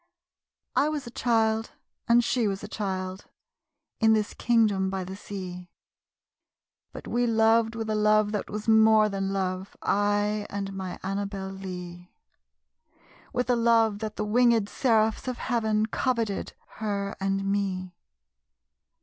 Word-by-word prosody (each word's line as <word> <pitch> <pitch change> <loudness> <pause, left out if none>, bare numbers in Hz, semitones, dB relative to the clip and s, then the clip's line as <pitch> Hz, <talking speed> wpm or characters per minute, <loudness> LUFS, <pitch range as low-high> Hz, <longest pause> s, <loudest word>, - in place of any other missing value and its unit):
I 295 - +3
was 300 -4 -3
a 235 - -8
child, 225 -2 +1 0.3
and 235 +1 +5
she 235 -1 +1
was 195 0 -3
a - - -5
child, 190 -3 -4 0.7
In 220 -1 +5
this 215 -1 0
kingdom 215 -5 +2
by 190 -1 -3
the 190 +1 -7
sea, 180 -3 -7 1.2
But - - -9
we 240 0 +1
loved 225 0 +3
with 225 -1 -4
a 215 - 0
love 215 0 +3
that 210 -2 -3
was 210 +1 -5
more 220 -1 +6
than 195 -1 -2
love, 190 0 -3
I 205 +1 +1
and 195 -1 -4
my 190 -2 -5
Annabel 195 0 -3
Lee; 180 -2 -8 1.2
With 250 +1 -1
a 250 - +3
love 230 -3 +3
that 215 -1 -5
the 210 - -2
winged 230 -1 +3
seraphs 220 -2 +1
of 250 -1 -2
heaven 220 -3 0
Coveted 230 -3 -1 0.3
her 200 -2 -2
and 195 0 0
me. 190 -2 -1
210 Hz, 140 wpm, -27 LUFS, 195-225 Hz, 1.2 s, more